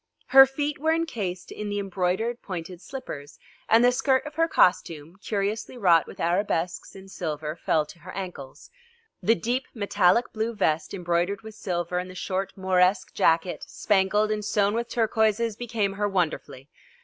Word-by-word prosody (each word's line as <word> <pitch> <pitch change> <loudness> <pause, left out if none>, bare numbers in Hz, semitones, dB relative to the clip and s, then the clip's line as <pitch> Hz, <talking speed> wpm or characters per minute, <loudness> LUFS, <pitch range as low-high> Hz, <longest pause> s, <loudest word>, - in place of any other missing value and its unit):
Her 270 0 +9
feet 290 +2 -3
were 320 +2 +2
encased 210 - -3
in 210 -1 -5
the 205 - -2
embroidered 195 +4 -1
pointed 180 -1 -7
slippers 155 - -8 0.3
and 230 +2 +6
the 245 - +6
skirt 260 +2 +1
of 300 - -7
her 330 +2 +2
costume, 170 - +1
curiously 205 +4 -3
wrought 175 -7 +4
with - - -12
arabesques 175 0 -1
in 195 0 -11
silver, 155 -4 -4
fell 155 -2 +1
to 150 +3 -14
her 180 +2 -10
ankles. 180 - -8 0.5
The 225 - +3
deep 245 +4 -2
metallic 200 +1 +2
blue 225 +1 -2
vest 160 -5 0
embroidered 180 +3 -1
with 220 0 -9
silver 180 -4 -2
and 180 +1 -5
the 185 - -11
short 190 +1 -3
Mauresque 185 0 +2
jacket 170 -2 +1
spangled 210 +1 +1
and 210 -1 -2
sewn 205 0 +1
with 235 +1 -2
turquoises 220 -1 +1
became 220 -4 -2
her 205 +1 -1
wonderfully. 155 -7 -2
195 Hz, 160 wpm, -26 LUFS, 180-225 Hz, 0.5 s, Her